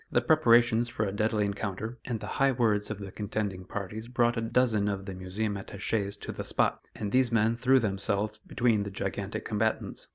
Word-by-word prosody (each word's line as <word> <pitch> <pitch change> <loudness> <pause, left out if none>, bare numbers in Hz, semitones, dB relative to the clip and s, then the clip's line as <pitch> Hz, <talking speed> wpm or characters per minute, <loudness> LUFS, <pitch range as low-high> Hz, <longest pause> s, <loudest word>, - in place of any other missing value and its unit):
The - - +4
preparations 120 -6 +4
for 115 -3 -1
a 100 - -2
deadly 105 +1 +1
encounter, 100 +3 -4
and 120 -3 -2
the - - -6 0.2
high 135 -1 +5
words 110 -4 +1
of 105 - -3
the 100 -1 -7
contending 100 -2 -3
parties 105 +4 -5
brought 120 -1 +2
a 115 - -1
dozen 115 -3 +2
of 100 -1 -2
the 95 - -5
Museum 95 +3 -3
attaches 100 +1 -3
to - - -4
the - - -5
spot, - - 0
and 105 -1 -4
these 130 -2 +3
men 115 0 +3
threw 130 +2 +4
themselves 105 0 -1
between 115 -1 +1
the 100 - -3
gigantic 100 +1 -4
combatants. 110 0 -1
110 Hz, 195 wpm, -29 LUFS, 100-115 Hz, 0.2 s, high